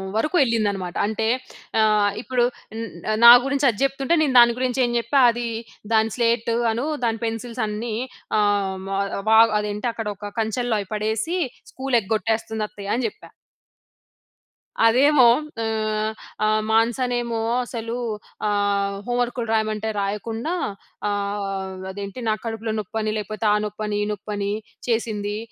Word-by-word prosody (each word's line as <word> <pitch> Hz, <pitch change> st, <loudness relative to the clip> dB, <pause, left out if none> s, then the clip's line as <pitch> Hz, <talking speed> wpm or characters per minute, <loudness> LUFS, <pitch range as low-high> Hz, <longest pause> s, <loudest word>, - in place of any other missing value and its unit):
వరుకు 305 Hz, +11 st, 0 dB
ఎళ్ళింది 230 Hz, -4 st, +1 dB
అనమాట. 185 Hz, -3 st, -5 dB
అంటే 220 Hz, +1 st, -1 dB, 0.5 s
ఆహ్, 210 Hz, -1 st, +4 dB
ఇప్పుడు 250 Hz, -1 st, 0 dB, 0.4 s
న్ 230 Hz, -, -3 dB, 0.4 s
నా 235 Hz, -, +13 dB
గురించి 280 Hz, +1 st, +1 dB
అది 215 Hz, -, -3 dB
జెప్తుంటే 275 Hz, +4 st, +1 dB
నేను 290 Hz, -4 st, +2 dB
దాని 235 Hz, -1 st, +6 dB
గురించి 255 Hz, 0 st, 0 dB
ఏం 240 Hz, -, -1 dB
చెప్పా, 235 Hz, +4 st, +1 dB
అదీ 240 Hz, 0 st, -2 dB, 0.5 s
దాని 220 Hz, 0 st, +3 dB
స్లేట్ 235 Hz, -1 st, +1 dB, 0.2 s
అను, 235 Hz, +5 st, -2 dB, 0.2 s
దాని 225 Hz, -1 st, 0 dB
పెన్సిల్స్ 230 Hz, +2 st, -4 dB
అన్నీ, 215 Hz, +2 st, -3 dB, 0.4 s
ఆహ్, 200 Hz, -2 st, +1 dB
మ -, -, -6 dB, 0.4 s
వ 220 Hz, 0 st, +7 dB, 0.2 s
అదేంటి 210 Hz, +2 st, -3 dB
అక్కడ 225 Hz, -2 st, -4 dB
ఒక 205 Hz, +1 st, -8 dB
కంచెల్లో 225 Hz, +1 st, 0 dB
అయి 195 Hz, -, -10 dB
పడేసీ, 220 Hz, -, -1 dB, 0.3 s
స్కూల్ 265 Hz, -2 st, 0 dB
ఎగ్గొట్టేస్తంది 220 Hz, +1 st, -1 dB
అత్తయ్య 200 Hz, 0 st, -5 dB
అని 245 Hz, 0 st, -1 dB
జెప్పా. -, -, -12 dB, 1.5 s
అదేమో 260 Hz, +3 st, +6 dB, 0.4 s
ఆహ్, 215 Hz, -1 st, -1 dB, 0.3 s
ఆ! -, -, +3 dB, 0.2 s
మానసానేమో 235 Hz, +1 st, +1 dB, 0.2 s
అసలూ 230 Hz, -1 st, -5 dB, 0.5 s
ఆహ్, 200 Hz, -1 st, +1 dB
హోమ్ 245 Hz, 0 st, -1 dB
వర్కులు 240 Hz, -1 st, -2 dB
రాయమంటే 215 Hz, 0 st, 0 dB
రాయకుండా, 220 Hz, -, -2 dB, 0.6 s
ఆహ్, 200 Hz, -1 st, -3 dB, 0.2 s
అదేంటి 200 Hz, +4 st, -7 dB
నాకు 215 Hz, 0 st, -1 dB
కడుపులో 225 Hz, -1 st, -3 dB
నొప్పని, 215 Hz, +1 st, -2 dB
లేపోతే 215 Hz, +1 st, -5 dB
ఆ -, -, +4 dB
నొప్పని 210 Hz, 0 st, -3 dB
ఈ -, -, -1 dB
నొప్పిని 205 Hz, -1 st, -4 dB, 0.4 s
చేసిందీ. 215 Hz, -3 st, -1 dB
220 Hz, 135 wpm, -23 LUFS, 210-240 Hz, 1.5 s, నా